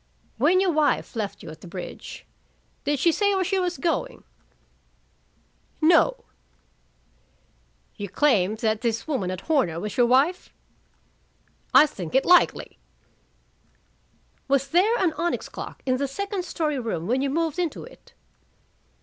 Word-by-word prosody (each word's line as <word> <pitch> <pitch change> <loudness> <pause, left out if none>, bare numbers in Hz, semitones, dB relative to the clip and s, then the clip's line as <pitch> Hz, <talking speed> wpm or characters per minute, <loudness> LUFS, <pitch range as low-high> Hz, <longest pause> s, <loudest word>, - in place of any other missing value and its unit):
"When 370 +1 +4
your 380 -1 +2
wife 305 -4 0
left 210 -3 -4
you - - -8
at 155 - -13
the - - -11
bridge, 180 +1 -8 0.6
did 290 +1 +1
she 335 +6 +3
say 405 +3 +1
where 380 - +1
she 380 +1 0
was 360 -1 -2
going?" - - -2 1.6
"No." 355 +10 +3 1.7
"You 200 -1 -5
claim 210 -5 +2
that 220 -1 -1
this 230 +1 -2
woman 255 -12 -1
at 185 0 -5
Horner 245 - 0
was 210 +2 -5
your 245 -1 +4
wife?" 275 +9 +2 1.2
"I - - +8
think 185 - -7
it 265 - +3
likely." 360 0 +3 1.7
"Was 275 0 +1
there 390 - +3
an 360 -7 +1
onyx 345 0 -1
clock - - -9
in 255 -1 +1
the 280 +1 -1
second 395 +5 -4
story 305 -6 -2
room 220 -9 -3
when 250 +6 0
you 275 - 0
moved 325 +3 -1
into 345 -3 -2
it?" - - -16
285 Hz, 140 wpm, -24 LUFS, 225-355 Hz, 1.7 s, I